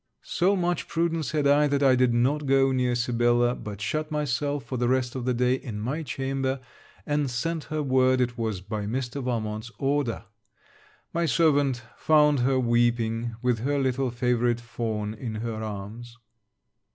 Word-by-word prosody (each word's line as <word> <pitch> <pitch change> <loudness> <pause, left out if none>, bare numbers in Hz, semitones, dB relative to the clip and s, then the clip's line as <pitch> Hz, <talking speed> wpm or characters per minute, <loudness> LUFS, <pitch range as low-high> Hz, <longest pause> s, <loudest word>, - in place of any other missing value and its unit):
So 190 +3 +2
much 175 -1 -1
prudence 165 -2 -1
had 150 -2 0
I, 145 +1 +5
that 140 0 +1
I 130 -2 +6
did 125 -1 +3
not 135 +5 +1
go 135 0 +4
near 125 -1 +1
Sibella, 120 0 +2
but 105 -4 -7
shut 155 +7 -2
myself, 145 -1 -1
for 130 - -5
the 120 0 +1
rest 130 -1 +1
of 130 -2 -4
the 125 - +1
day, 125 +1 +2
in 120 -5 -4
my 130 +9 -2
chamber, 135 -2 -2 0.5
and 145 -2 0
sent 160 +6 -2
her 155 -1 -2
word 130 -1 +3
it 125 -1 0
was 110 -5 -3
by 105 +1 -4
Mr. 130 +4 -3
Valmont's 110 -2 -3
order. 135 -5 -1 0.9
My 170 0 +1
servant 140 -2 +2
found 150 -2 +4
her 130 +1 +2
weeping, 120 -1 +1
with 125 -2 +1
her 145 +5 0
little 130 -1 0
favourite 120 0 +1
Fawn 110 -3 -3
in 110 0 -6
her 110 0 -4
arms. 110 +3 -7
125 Hz, 165 wpm, -26 LUFS, 120-140 Hz, 0.9 s, I